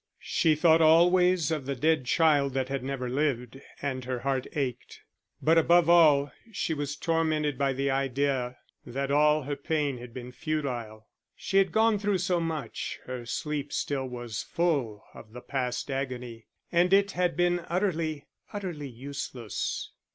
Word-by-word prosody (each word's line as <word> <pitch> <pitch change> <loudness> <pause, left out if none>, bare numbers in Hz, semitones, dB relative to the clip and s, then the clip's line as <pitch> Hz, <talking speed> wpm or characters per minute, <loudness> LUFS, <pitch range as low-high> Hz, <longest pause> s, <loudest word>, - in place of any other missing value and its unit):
She 160 -2 +1
thought 160 +1 +5
always 175 +1 +5
of 150 -4 -2
the 140 - -1
dead 155 +1 +1
child 145 -2 +3
that 130 -1 -1
had 135 -2 -3
never 135 -1 -3
lived, 130 -1 -1 0.2
and 130 -2 -2
her 125 -1 -3
heart 135 -1 -1
ached. 135 -5 -4 0.4
But 165 +1 +5
above 170 +1 +4
all 150 -5 +5 0.2
she 170 - -1
was 145 -1 -3
tormented 155 -2 0
by 135 0 0
the 135 +1 0
idea 135 -2 -1 0.3
that 135 +3 -3
all 150 +1 +4
her 145 +2 -3
pain 145 -3 -1
had 120 0 -10
been 125 +1 -8
futile; 125 -7 -4 0.3
she 195 - -1
had 190 -3 +2
gone 220 +1 +3
through 205 -1 +1
so 180 0 0
much, 160 -7 -4
her 125 -2 -6
sleep 150 +1 -3
still 135 -2 -2
was 120 -3 -5
full 140 -12 -1
of 110 - -13
the 125 - -7
past 125 0 -3
agony, 125 -4 -5 0.2
and 175 +1 +3
it 200 +1 +4
had 180 -1 0
been 175 0 +2
utterly, 165 -5 -1 0.3
utterly 175 -9 -5
useless. 125 -3 -5
145 Hz, 160 wpm, -28 LUFS, 130-165 Hz, 0.4 s, thought